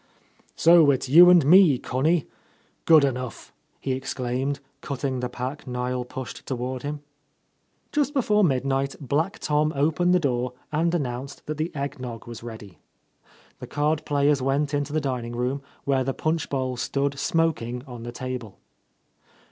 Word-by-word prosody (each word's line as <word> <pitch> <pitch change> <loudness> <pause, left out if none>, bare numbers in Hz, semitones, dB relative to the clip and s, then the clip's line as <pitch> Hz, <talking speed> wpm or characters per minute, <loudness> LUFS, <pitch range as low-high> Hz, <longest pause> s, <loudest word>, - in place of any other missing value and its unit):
"So 165 -2 +6
It's 135 -1 +1
you 175 +6 +9
and 175 -5 +6
me, 170 -3 +7
Connie? 150 +7 0 0.6
Good 160 -3 +7
enough 125 -4 -3
!'' - - -43
he 135 - -2
exclaimed, 130 +1 -2 0.2
cutting 135 -2 -3
the 125 0 -3
pack 130 +4 -6
Niel 125 0 -2
pushed 130 0 -7
toward 130 0 -3
him. 145 +1 -5 0.9
Just 290 -1 +1
before 210 -5 +3
midnight 135 -2 0
Black 155 - -1
Tom 150 +1 +1
opened 160 +5 +2
the - - +4
door 125 -5 -1 0.2
and 165 +2 +1
announced 130 -3 -4
that 155 0 -4
the 155 +3 -2
egg 140 -1 -4
nog 120 -3 -7
was 120 -1 -9
ready. 110 -7 -10 0.8
The - - -8
card 150 +1 0
players 145 -1 +2
went 140 +2 0
into 145 0 -1
the 155 +1 0
dining 125 -4 -3
room, 125 +3 -1 0.2
where 135 -1 +1
the 135 +1 -2
punch 160 0 -1
bowl 130 -2 -2
stood 140 +2 -1
smoking 140 -8 0
on 125 -4 -9
the 120 +1 -6
table. 125 -4 -6
140 Hz, 155 wpm, -25 LUFS, 125-150 Hz, 0.9 s, you